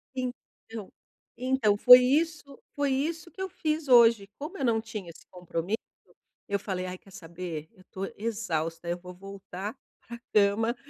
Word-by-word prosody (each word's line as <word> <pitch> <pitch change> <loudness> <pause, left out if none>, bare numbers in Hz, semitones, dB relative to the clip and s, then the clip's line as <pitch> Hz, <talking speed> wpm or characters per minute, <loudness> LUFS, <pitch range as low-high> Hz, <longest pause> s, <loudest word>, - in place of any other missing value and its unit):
Então 245 -4 -7 0.5
então 255 -4 +2
foi 250 +4 +10
isso 285 +1 0 0.2
foi 285 -1 +1
isso 325 +5 -2
que 380 - -9
eu 380 - -2
fiz 310 -3 -2
hoje. 230 -4 +6
Como 310 +7 -6
eu - - -3
não 230 -2 +3
tinha 215 -5 -7
esse 165 - -15
compromisso, 180 +2 -3 0.7
eu 200 - 0
falei: 185 -2 -3
"Ai 185 0 -5
quer 195 - -20
saber, 170 -4 -7
eu 185 -4 -20
tô 190 +1 -4
exausta, 170 -7 -3
eu 175 +1 -1
vou 180 +1 -11
voltar 195 +1 -7 0.4
para 235 - -6
a - - -36
cama" 215 +3 +3
220 Hz, 165 wpm, -28 LUFS, 185-255 Hz, 0.7 s, foi